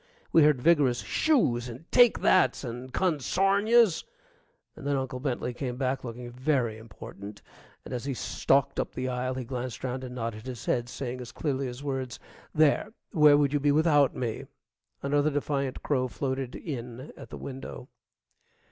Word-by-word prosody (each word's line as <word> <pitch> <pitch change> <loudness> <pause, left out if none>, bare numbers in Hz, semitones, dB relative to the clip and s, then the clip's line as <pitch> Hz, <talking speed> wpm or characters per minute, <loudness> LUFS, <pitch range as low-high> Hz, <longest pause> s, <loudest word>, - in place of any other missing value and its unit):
We 165 - +6
heard 150 -3 +5
vigorous 140 -4 +3
"Shoos!" 125 - +1
and 125 +7 -9
"Take 245 -2 +6
thats!" 185 - +3
and 125 +1 -6
"Consairn 190 - +1
yous!" 230 -7 +5 0.7
and 140 - -7
then 145 - +2
Uncle 130 -1 -3
Bentley 125 -2 -2
came 125 -1 -4
back 130 0 -1
looking 120 0 -7
very 125 -4 0
important, 100 -2 -10 0.4
and - - -7
as 125 +1 -4
he 140 -2 -2
stalked 135 +2 +1
up - - -3
the 130 0 -2
aisle 130 0 -2
he 130 - -3
glanced 125 0 -5
around 130 +1 -3
and 125 -1 -7
nodded 115 -1 -5
his 125 -3 -6
head, 120 -1 0
saying 125 -1 -5
as 120 - -8
clearly 135 -3 -2
as 125 +3 -7
words, 135 -3 -3 0.3
"There, 155 +7 +3 0.2
where 150 -2 +6
would 145 -1 +2
you 145 - +2
be 145 +1 +3
without 145 -2 +4
me?" 115 -3 -3 0.6
Another 145 +2 +2
defiant 140 -2 -2
crow 130 -3 +1
floated 130 0 -3
in 125 -2 -6
at - - -11
the - - -7
window. 135 -1 -8
130 Hz, 170 wpm, -28 LUFS, 125-145 Hz, 0.7 s, We